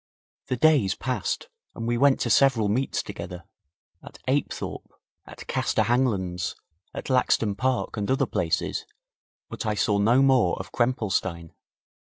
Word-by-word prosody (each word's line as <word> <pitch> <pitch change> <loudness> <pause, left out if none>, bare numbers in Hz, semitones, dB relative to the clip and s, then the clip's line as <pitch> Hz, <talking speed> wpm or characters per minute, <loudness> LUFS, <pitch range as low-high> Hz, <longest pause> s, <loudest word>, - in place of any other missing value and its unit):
The 130 - 0
days 135 -9 +3
passed 130 - -3 0.3
and 115 - -5
we 120 - +1
went 135 +2 +4
to 120 - 0
several 120 -4 +4
meets 130 +6 0
together 90 0 -7 0.6
at - - -12
Apethorpe, - - -2 0.4
at - - -11
Castor 110 - 0
Hanglands, 100 -7 0 0.4
at - - -6
Laxton 115 -4 +2
Park 130 0 -1
and 100 -1 -2
other 135 +1 +2
places, 85 -8 -1 0.6
but - - -6
I 110 -1 -1
saw 100 0 +1
no 120 +6 +4
more 130 -10 +3
of 95 - -8
Krempelstein. 95 -9 -1
115 Hz, 140 wpm, -25 LUFS, 100-130 Hz, 0.6 s, went